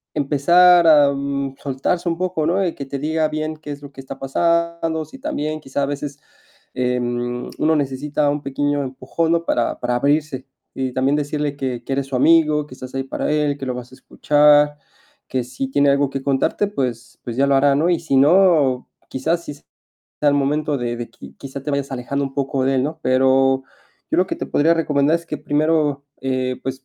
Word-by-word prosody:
empezar, 170 +5 +5
am, 140 -2 +3
soltarse 145 +6 -1
un 165 - -2
poco, 180 -3 -1
¿no? 190 +3 +1
Y 170 - -1
que 140 - -7
te 140 +1 -5
diga 155 +2 0
bien, 155 +1 -4
¿qué 155 -1 -11
es 145 0 -8
lo 140 - -10
que 135 - -10
está 135 0 -9
pasando? 170 +2 0
Sí, 270 - -14
también 155 - -3
quizá 140 0 -3
a - - +2
veces, 145 0 -5 0.5
em, 120 -1 -2
uno 160 +1 +3
necesita 145 +1 -1
un 145 0 -3
pequeño 145 +1 -1
empujón, 135 +5 -2
¿no? 170 0 0
Para 120 - 0
para 125 0 -1
abrirse. 140 0 0 0.3
Y 130 -1 -3
también 135 +3 +1
decirle 145 0 -2
que 130 -3 -4
que 135 - -3
eres 135 0 -2
su 135 - -4
amigo, 155 +1 +4
que 145 - -13
estás 130 0 -10
ahí 135 - -1
para 135 - -3
él, 150 -1 0
que 135 - -6
lo 125 - -2
vas 125 0 -8
a - - -13
escuchar, 145 +1 +3 0.5
que 130 -1 -2
si 130 +2 -5
tiene 140 +1 +3
algo 140 0 +2
que 135 0 -5
contarte, 140 +8 +1
pues 125 - -4
pues 120 - -5
ya 135 +3 +3
lo 140 0 +3
hará, 140 +1 +4
¿no? 160 +5 +2
Y 170 - +1
si 160 -4 -1
no, 150 -3 +4 0.2
quizás 165 +6 -1
sí 145 - -7
sea 145 - -20 0.6
el 145 - +3
momento 145 +2 0
de 120 -2 -3
de 120 0 -6
qui 70 0 -14
quizá 135 0 -8
te 150 - -3
vayas 140 -1 -2
alejando 135 +2 -2
un 135 0 -7
poco 135 -1 -1
de 135 +1 +1
él, 130 - +2
¿no? 155 +4 -3
Pero 130 +1 +3 0.5
yo - - +1
lo 185 - +3
que - - -3
te - - -4
podría 165 +3 +3
recomendar 150 -2 +1
es 170 - -10
que 150 - -5
primero, 150 -1 0 0.2
eh, 130 -1 -2
pues, 130 0 -5
140 Hz, 210 wpm, -20 LUFS, 135-155 Hz, 0.6 s, empezar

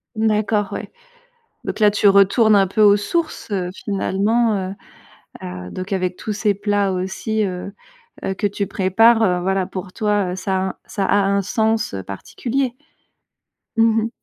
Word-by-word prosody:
D'accord, 215 -1 +1
ouais. - - -5 0.8
Donc - - -4
là, 210 -1 +6
tu 205 0 +3
retournes 200 +3 +5
un 195 -1 +4
peu 190 +3 -2
aux 205 -1 +7
sources, 315 +7 -3
heu, 185 -3 -1 0.2
finalement, 210 +3 +1 0.2
heu 195 - -6 0.7
heu, 90 0 -7
donc 185 +2 -6
avec 185 -1 -1
tous 215 - -4
ces 210 0 +1
plats 205 -1 0
aussi, 200 +4 -2
heu 185 0 -5 0.5
heu, 190 - -1
que 205 - -1
tu 200 0 -2
prépares, 220 +5 +3
heu, 180 -4 +2
voilà, 190 +1 0
pour 185 0 -7
toi, 205 -4 0
heu, 185 - -4
ça 190 +1 -2
un 190 0 -2
ça 195 -2 -2
a - - +2
un 200 0 +2
sens, 220 - 0
heu, 95 - -4
particulier? 245 - -3 1.0
Mmh 225 -1 +3
mh. 225 - -2
200 Hz, 170 wpm, -20 LUFS, 190-220 Hz, 1.0 s, aux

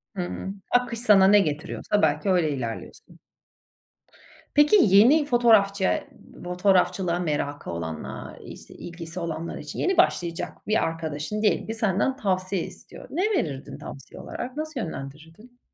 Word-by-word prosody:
Hıı. 185 +1 -4 0.2
Akış 245 -2 +1
sana 205 -5 +6
ne 205 +1 +7
getiriyorsa 170 +5 -1
belki 155 +5 +1
öyle 175 -5 +2
ilerliyorsun. 120 -5 -6 1.4
Peki 295 +7 +6
yeni 230 +10 +6
fotoğrafçı 215 -7 +3 0.4
fotoğrafçılığa 180 -1 +1
merakı 145 - -3
olanlar, 80 -2 -6
işte, - - -11
ilgisi 170 0 -7
olanlar 170 -1 -4
için, 150 -1 -7
yeni 380 0 +1
başlayacak 175 - 0
bir 215 - +2
arkadaşın 165 +5 -3
diyelim 215 - +1
ki 225 - -3
senden 220 +4 0
tavsiye 185 -4 -1
istiyor. - - -10
Ne 345 - -1 0.2
verirdin 140 -4 -4
tavsiye 140 - -10
olarak? 255 +4 -7
Nasıl 310 -3 -4
yönlendirirdin? 160 - -8
185 Hz, 125 wpm, -25 LUFS, 160-220 Hz, 1.4 s, ne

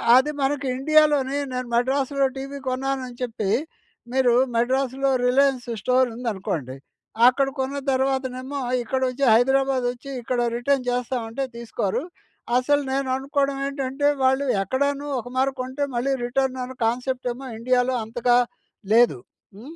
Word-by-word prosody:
అది 265 +4 +4
మన 270 +1 +2 0.3
ఇండియాలోనే 295 -1 +3 0.2
నేను 250 -1 -3
మడ్రాసులో 270 +3 +1
టీవీ 275 +1 -6
కొన్నానని 255 -1 -2
చెప్పి, 220 -5 -2 0.6
మీరు 255 -2 +3 0.2
మడ్రాసులో 265 +3 +1 0.2
రిలయన్స్ 260 -1 +2
స్టోర్ 255 +2 +3
ఉందనుకోండి. 190 - -3 0.5
అక్కడ 270 +2 +3
కొన్న 270 +2 -2
తర్వాతనేమో 265 +1 -1 0.2
ఇక్కడ 260 +3 -2
వచ్చి 265 +2 -4
హైదరాబాదొచ్చి 260 +1 +1
ఇక్కడ 245 +1 -1 0.2
రిటర్న్ 255 0 0
చేస్తామంటే 245 0 -2
తీసుకోరు. 235 -1 -2 0.5
అసలు 290 +3 +2
నేను 270 0 0
అనుకోవడం 275 0 -1
ఏంటంటే 275 +1 -1 0.2
వాళ్ళు 265 +2 +3 0.2
ఎక్కడనో 280 +7 -1
ఒక 245 - -8
మారి 270 +1 +2
కొంటే 260 +3 -3
మళ్ళీ 255 +3 0
రిటర్న్ 260 +1 -1
అనే 260 +1 -7
కాన్సెప్ట్ 250 +2 -1
ఏమో 265 +2 -9
ఇండియాలో 250 +1 +1
అంతగా 240 +2 +2 0.6
లేదు. 230 - +5 0.4
హ్మ్. 265 +11 -11
260 Hz, 125 wpm, -23 LUFS, 245-275 Hz, 0.6 s, లేదు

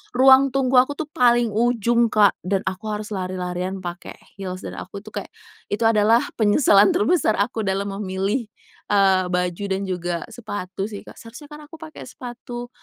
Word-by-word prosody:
ruang 265 +1 +6
tunggu 265 -1 +1
aku 260 - -3
tuh 315 - -4
paling 240 -3 +3
ujung, 235 0 +2
Kak, 205 -2 +4
dan 190 +2 0
aku 190 +2 -3
harus 210 0 -5
lari-larian 185 0 -4
pakai 175 -1 -7 0.2
heels 185 -2 -6
dan - - -7
aku 200 - -8
tuh 215 +1 -14
kayak, - - -18 0.4
itu 210 +3 -1
adalah 225 +1 +4 0.2
penyesalan 205 -2 +4
terbesar 220 -1 +2
aku 220 +1 -1
dalam 195 +1 -1
memilih, 200 +4 -2 0.5
eee, 195 -2 +4
baju 180 +1 -1
dan 190 +1 -1
juga 175 -2 -3
sepatu 205 -5 -6
sih, 205 - -6
Kak. - - -12
Seharusnya 245 +6 -12
kan 300 0 -10
aku 310 +2 -13
pakai 315 -1 -10
sepatu, 245 -1 -8
210 Hz, 170 wpm, -22 LUFS, 190-240 Hz, 0.5 s, ruang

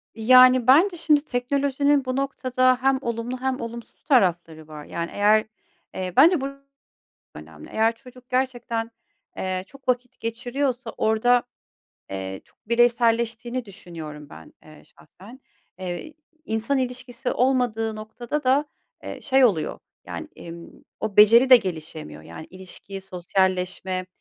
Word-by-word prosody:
Yani, 255 +2 +6
bence 345 +8 +5
şimdi 300 -3 +2
teknolojinin 280 +2 +1
bu 255 0 -2
noktada 255 -2 +1
hem 270 0 +3
olumlu 235 +1 -3
hem 260 -1 -1
olumsuz 235 0 -9
tarafları 175 - +1
var. 150 -1 -10
Yani, 170 0 -5
eğer, 210 +1 +3 0.5
eee, 185 -1 -4
bence 340 -2 +6
bu - - -2
çok 275 0 -10 0.8
önemli. 75 0 -12
Eğer 225 +1 +2
çocuk 250 +1 -16
gerçekten, 240 -3 -2 0.5
eee, 185 0 -2
çok 275 +3 -18
vakit 250 0 -1
geçiriyorsa 245 +2 -3
orada, 240 +3 +3 0.7
eee, 95 0 -5
çok - - -32
bireyselleştiğini 235 +1 +1
düşünüyorum 160 -7 -10
ben, - - -13
eee, 155 -1 -16
şahsen. 195 - -17 0.4
Eee, 185 - -6 0.3
insan 225 +5 -1
ilişkisi 250 0 -3
olmadığı 240 -4 0
noktada 240 +7 -5
da, 265 +3 +3 0.4
eee, - - -7
şey 265 -1 +3
oluyor 190 -10 +1 0.3
yani, - - -7
imm, 170 0 -10 0.3
o 215 -2 -4
beceri 230 +5 +7
de 255 - +12
gelişemiyor 160 - -6
yani; 85 - -10
ilişki, 190 +1 -9
sosyalleşme, 185 0 -1
235 Hz, 130 wpm, -24 LUFS, 185-255 Hz, 0.8 s, de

